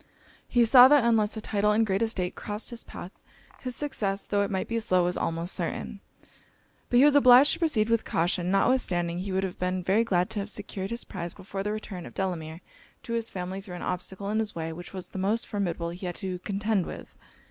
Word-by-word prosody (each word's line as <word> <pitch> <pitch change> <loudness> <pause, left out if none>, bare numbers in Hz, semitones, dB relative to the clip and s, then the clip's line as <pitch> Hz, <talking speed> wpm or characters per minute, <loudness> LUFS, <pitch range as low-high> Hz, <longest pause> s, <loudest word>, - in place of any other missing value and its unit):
He 240 -1 +3
saw, 250 +2 +9
that 290 -2 +5
unless 225 -2 +2
a - - -4
title 210 0 +1
and 225 +1 +3
great 195 0 0
estate 190 -6 -1
crossed 210 +3 -5
his 235 - -6
path, 180 - -9 0.5
his 255 -2 -4
success, 200 -9 -2
tho' 205 -1 0
it 200 - 0
might 190 -1 -2
be 230 0 -1
slow, 185 -5 +2
was 180 +1 0
almost 165 +2 -2
certain. - - -3 0.9
But 245 - +3
he 265 - +7
was 295 - +6
obliged 260 0 +7
to 330 - -4
proceed 275 -11 +1
with 230 -1 +2
caution; 175 +1 0
notwithstanding 180 -5 +1
he 190 +2 -4
would 190 +1 0
have 190 -2 -4
been 180 0 -1
very 200 +6 +3
glad 180 -5 0
to 210 - -2
have 200 +1 -4
secured 200 -2 -4
his 235 +1 -3
prize 175 -3 -6
before 195 +1 -6
the 210 +1 -2
return 210 -4 -6
of - - -13
Delamere 170 -3 -3 0.4
to 230 - -5
his 230 -1 -1
family 185 +1 -5
threw 190 -3 -9
an 175 - -7
obstacle 190 +2 -4
in 215 - +1
his 220 -1 -2
way 165 -1 -4
which 175 +2 -9
was 185 -2 -7
the 190 - -6
most 210 +5 +1
formidable 175 -5 -2
he 180 +2 -6
had 175 - -4
to 185 -2 -4
contend 200 0 -1
with. - - -9
195 Hz, 225 wpm, -27 LUFS, 180-225 Hz, 0.9 s, saw